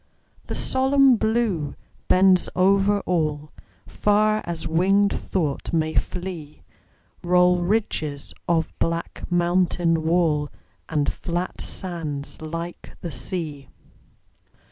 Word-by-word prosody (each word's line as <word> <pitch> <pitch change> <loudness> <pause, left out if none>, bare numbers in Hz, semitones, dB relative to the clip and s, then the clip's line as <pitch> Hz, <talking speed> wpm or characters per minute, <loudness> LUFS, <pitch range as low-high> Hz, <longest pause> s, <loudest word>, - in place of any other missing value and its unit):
The - - -4
solemn 265 0 +4
Blue 220 -10 0 0.3
bends 185 -1 +4
over 200 +2 +3
all; 155 -5 -1 0.3
Far 215 +1 +2
as 170 -1 -4
winged 195 +5 +3
thought 155 -7 -2
may 160 -1 +1
flee 175 -5 -4 0.6
Roll 180 0 +4
ridges 175 -7 -1
of 165 -1 +1
black 165 0 -2
mountain 175 -1 +2
wall, 160 -3 +2 0.4
And 150 -3 0
flat 175 +1 -4
sands 160 -7 -5
like 165 +2 -6
the 170 - -5
sea. 145 +2 -5
175 Hz, 100 wpm, -23 LUFS, 160-190 Hz, 0.6 s, solemn